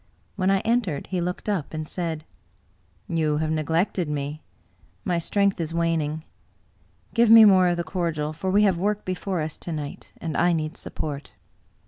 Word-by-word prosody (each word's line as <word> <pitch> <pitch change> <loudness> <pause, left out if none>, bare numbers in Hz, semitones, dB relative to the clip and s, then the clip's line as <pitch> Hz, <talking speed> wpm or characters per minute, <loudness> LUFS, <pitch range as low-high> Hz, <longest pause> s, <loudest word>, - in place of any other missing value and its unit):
When 190 -1 +1
I 195 -1 +3
entered, 225 -10 0
he 180 -2 0
looked 180 +4 -4
up, 185 -7 -2
and 155 0 -4
said: 165 -3 -4 0.4
" 95 0 -38 0.3
You 155 -3 +1
have 155 0 -1
neglected 160 +2 0
me. 145 +1 -3 0.6
My 175 -4 +1
strength 200 +2 +1
is 165 0 -3
waning. 160 -2 0 0.9
Give 235 -1 +4
me 225 -1 +10
more 190 -3 +6
of 175 -1 +1
the 170 - -1
cordial, 160 -4 -2
for 185 +4 -3
we 205 +3 +4
have 190 -4 +3
work 205 +2 -1
before 185 -1 -2
us 155 0 -4
to 170 - -7
night, 150 -3 -6
and 160 -2 -4
I 175 0 +3
need 155 -1 -2
support." 145 -2 -6
170 Hz, 175 wpm, -25 LUFS, 155-190 Hz, 0.9 s, me